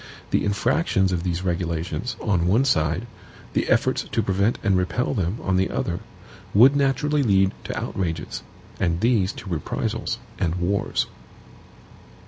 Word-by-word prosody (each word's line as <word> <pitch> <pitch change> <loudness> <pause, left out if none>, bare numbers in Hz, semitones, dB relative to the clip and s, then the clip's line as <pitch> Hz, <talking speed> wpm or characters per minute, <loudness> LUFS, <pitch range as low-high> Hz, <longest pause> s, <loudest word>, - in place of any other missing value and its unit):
The - - +2
infractions 100 - +1
of 90 -2 0
these 90 0 -2
regulations, 85 +5 -2
on 90 -6 +1
one 115 +9 +4
side, 80 - +1 0.5
the - - 0
efforts - - +2
to - - +1
prevent 100 +4 +1
and 100 -2 +3
repel 90 +9 0
them, 95 -2 -1
on 95 -1 +1
the 95 - +2
other, - - -2 0.6
would 130 +7 +7
naturally 140 +2 +2
lead 95 -6 +3
to - - -3
outrages, 80 -5 -3 0.4
and 85 -2 +1
these 110 -3 +2
to - - -10
reprisals 80 -4 -2 0.2
and 85 -1 0
wars. 90 +3 0
95 Hz, 140 wpm, -24 LUFS, 85-115 Hz, 0.6 s, would